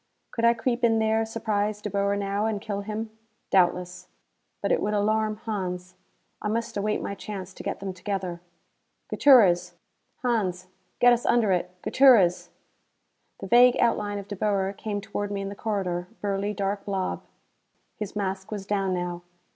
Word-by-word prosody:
Could 230 - 0
I 235 0 +5
creep 240 +1 -1
in 225 -1 +4
there, 220 0 +2
surprise 215 -2 -1
De 210 - -5
Boer 200 0 0
now, 200 +1 -1
and 215 -2 -1
kill 200 -1 -4
him? 215 +2 -5 0.4
Doubtless. 180 -1 +1 0.5
But 200 - -1
it - - +2
would 210 +1 0
alarm 215 +1 +1
Hans. 185 -4 -4 0.5
I - - -2
must 230 +2 -2
await 210 +1 -1
my - - -3
chance 195 -2 -7
to - - -10
get - - -4
them 195 -1 -5
together. 185 -1 -4 0.7
"Gutierrez! 180 -10 +5 0.5
Hans, 195 -7 0 0.3
get 245 0 +6
us 240 - 0
under 230 -4 +3
it! 180 -1 0
Gutierrez!" 230 -10 +5 0.9
The - - -4
vague 245 +1 +6
outline 210 -3 +1
of 200 -1 -7
De 205 - -5
Boer 195 -1 0
came 205 -1 -4
toward 205 +1 -4
me 200 -1 -3
in 195 - -4
the 200 - -7
corridor, 185 -5 -2
burly 205 +1 -2
dark 200 0 -2
blob. 195 -2 -2 0.7
His 210 -1 -6
mask 190 -2 -3
was 205 -2 -5
down 195 -2 0
now. 175 -1 -3
205 Hz, 165 wpm, -26 LUFS, 190-220 Hz, 0.9 s, get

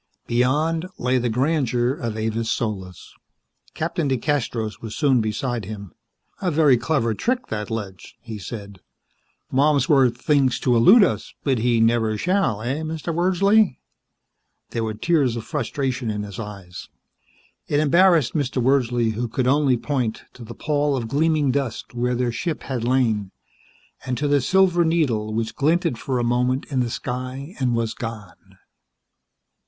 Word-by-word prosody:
Beyond 150 +8 +1
lay 125 +1 +1
the 120 0 -1
grandeur 125 -1 +1
of 115 -6 -4
Avis 110 +1 -2
Solis. 95 -6 -4 0.6
Captain 160 -1 -1
DeCastros 125 -5 -1
was 110 -2 -6
soon 135 -6 +3
beside 110 +1 -2
him. 100 -3 -8 0.5
"A 185 - +1
very 150 -4 +4
clever 115 -2 0
trick, 250 - -1
that 105 -1 -4
ledge," 105 -5 -6
he 110 -2 -8
said. 100 -1 -8 0.7
"Malmsworth 135 -3 +3
thinks 135 -2 +2
to 125 -2 +2
elude 195 - +7
us, 190 - -2
but 135 -4 +1
he 120 0 +2
never 115 -1 +2
shall, 170 - 0
eh, 130 +5 -2
Mr. 160 +1 -4
Wordsley?" 190 +1 +3 0.9
There 115 - -2
were 110 -1 -3
tears 140 -3 +1
of 115 - -5
frustration 135 -4 -2
in 105 -1 -2
his 100 -1 -8
eyes. 100 -5 -8 0.8
It 145 - +1
embarrassed 165 -2 +4
Mr. 140 -4 -1
Wordsley, 120 -3 +2
who 120 +3 -3
could 125 +3 -2
only 135 -1 +3
point 125 -4 -2
to 125 - -11
the 115 +1 -9
pall 145 -1 0
of 115 -3 -4
gleaming 150 0 +2
dust 130 -5 -3
where 125 +1 0
their 120 0 0
ship 160 +6 -3
had 130 -4 -3
lain, 115 -5 +1 0.7
and 125 -1 -3
to 145 - -1
the 145 -1 +3
silver 180 +4 +3
needle 135 -11 0
which 110 +1 -2
glinted 160 -3 +1
for 130 -2 -2
a 120 - 0
moment 125 +2 +1
in 135 - 0
the 120 -1 0
sky 130 +6 -5
and 125 -3 +1
was 115 -1 -1
gone. 110 -7 -9
125 Hz, 155 wpm, -22 LUFS, 115-150 Hz, 0.9 s, elude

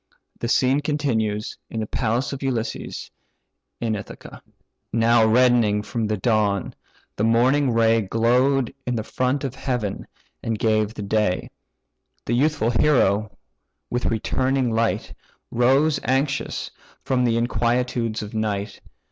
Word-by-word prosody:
The 115 - -2
scene 130 +3 +3
continues 120 -8 -1
in 115 - -4
the 110 - -1
palace 120 +5 -1
of 140 - -6
Ulysses, 125 -4 -3 0.7
in 115 -2 -1
Ithaca. 100 - -9 0.5
Now 115 0 +4
reddening 115 -3 +3
from 115 0 -2
the 105 0 -1
dawn, 105 -2 +1 0.4
the 105 - 0
morning 125 +5 +3
ray 115 -1 +3
Glow'd 125 +5 +2
in 125 - 0
the 110 - -2
front 130 +5 -1
of 135 -3 -3
heaven, 125 -7 -3 0.3
and 115 -1 -2
gave 110 -1 +1
the 105 - -5
day 100 -2 0 0.7
The 120 - -1
youthful 135 -2 +2
hero, 110 -6 +2 0.5
with 120 0 -1
returning 130 +3 0
light, 115 0 0 0.4
Rose 135 +5 +3
anxious 135 +3 -1 0.3
from 130 -2 +1
the 115 -1 +2
inquietudes 120 -1 0
of 105 - -8
night. 105 -2 -3
115 Hz, 130 wpm, -23 LUFS, 110-130 Hz, 0.7 s, Now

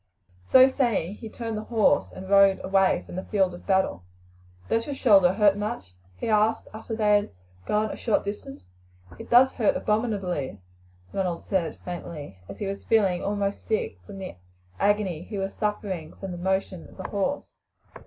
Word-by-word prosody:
So 260 0 +8
saying 235 - 0
he 225 - -8
turned 225 -1 -5
the 215 - -7
horse 225 -3 +2
and 190 - -9
rode 195 0 +5
away 195 0 +2
from - - -10
the 185 - -4
field 190 -3 +1
of 175 - -12
battle. 190 - +1 0.7
"Does 230 0 0
your 285 - -3
shoulder 195 -8 +5
hurt 200 0 +4
much?" 205 - -5 0.2
he - - -4
asked 215 +1 +2
after 225 +1 -6
they 210 -2 +4
had 205 - -3 0.4
gone 215 0 +1
a - - -5
short 220 -4 0
distance. 135 - -7 0.5
"It - - -9
does 250 +2 +6
hurt 225 -5 +2
abominably," 195 - -1 0.5
Ronald 180 -3 -2
said 175 -6 -1
faintly, 155 - -7
for - - -8
he 205 - -5
was 195 0 -4
feeling 195 -5 +2
almost 200 0 -2
sick 215 - -1
from 195 - -10
the 190 - -7 0.4
agony 200 -5 +1
he 205 +4 -7
was 195 0 -3
suffering 195 -6 -3
from 195 -1 -7
the 175 - -6
motion 190 -1 -2
of - - -17
the 190 - -5
horse. 205 +8 -3
200 Hz, 175 wpm, -26 LUFS, 185-215 Hz, 0.7 s, So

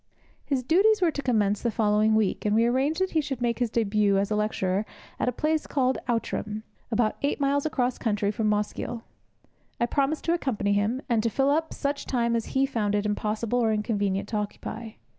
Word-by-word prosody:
His 270 -3 -1
duties 395 - +4
were 350 -3 +3
to 285 - -4
commence 210 -6 +1
the 235 - +1
following 215 0 +2
week, 215 -3 +1
and 210 0 +1
we 230 +1 +4
arranged 270 +8 +1
that 375 - +1
he 315 - +2
should 275 -4 -4
make 240 -1 0
his 245 -2 +1
debut 210 -3 +2
as 200 +2 0
a - - +2
lecturer 205 -2 0 0.4
at - - +1
a - - 0
place 310 +4 -1
called 260 -2 +1
Outram, 215 -2 -2 0.3
about 225 -1 +1
eight 285 +2 0
miles 280 +1 +1
across 250 -4 -1
country 210 -3 0
from 215 0 0
Mosgiel. 210 +3 -2 0.8
I 235 - +3
promised 280 +4 0
to 335 - +2
accompany 220 -11 0
him, 215 +7 0
and 235 -3 +2
to 230 - +1
fill 270 +5 +2
up 320 +2 0
such 280 0 -3
time 235 -2 +1
as 230 - -1
he 270 - +4
found 215 -6 -1
it 205 0 0
impossible 215 +3 -1
or 225 -2 +2
inconvenient 205 -2 -1
to 220 - -1
occupy. 215 +2 -5
230 Hz, 205 wpm, -26 LUFS, 210-275 Hz, 0.8 s, duties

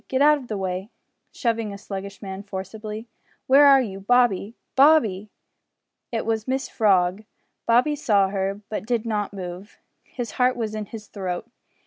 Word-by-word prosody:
Git 260 - 0
out 300 +1 +5
o' 260 - -10
the 215 - -3
way," 190 +1 -3 0.4
(shoving 230 -3 -1
a 200 - -7
sluggish 200 0 -7
man 190 0 -6
forcibly), 210 +3 -7 0.4
"where 280 +2 +7
are 270 -2 +7
you, 195 -4 -6
Bobby? 230 -1 +2 0.2
Bo 270 - +6
o - - +9
o 315 - +8
o - - +7
o - - +6
by!" 205 -2 -5 0.8
It 230 -2 -2
was 220 -1 -1
Mrs 265 +1 -2
Frog! 195 -2 +2 0.4
Bob 235 +2 +5
saw 205 -8 +3
her, 195 +1 -2
but 215 0 -4
did 235 -2 0
not 210 -3 -1
move. 185 +1 -8 0.3
His 245 -2 -6
heart 250 0 +2
was 220 -3 -3
in 215 -1 -4
his 220 0 -9
throat! 190 0 -5
215 Hz, 185 wpm, -24 LUFS, 195-240 Hz, 0.8 s, o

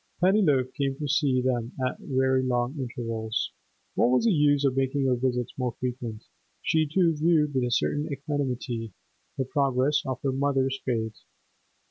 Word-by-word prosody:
Pennyloaf 175 -9 +3
came 135 -1 -1
to 150 - -3
see 140 -3 +2
them 120 -2 -1
at 130 - -3
very 130 -1 +1
long 125 +1 0
intervals; 115 -3 -3 0.4
what - - +3
was 125 - +3
the 230 - +5
use 145 -4 +3
of 130 -2 +2
making 135 +1 +1
her 130 -1 +3
visits 125 -1 -1
more 125 -2 -1
frequent? 120 -3 -4 0.4
She, 160 -1 +2
too, 170 -2 +3
viewed 150 -1 +2
with 130 -2 +1
a - - -1
certain 145 +5 +1
equanimity 130 - -3 0.4
the 130 - 0
progress 135 +1 +1
of 130 -1 -2
her 135 - +1
mother's 135 0 0
fate. 110 -4 -2
130 Hz, 160 wpm, -27 LUFS, 125-145 Hz, 0.4 s, the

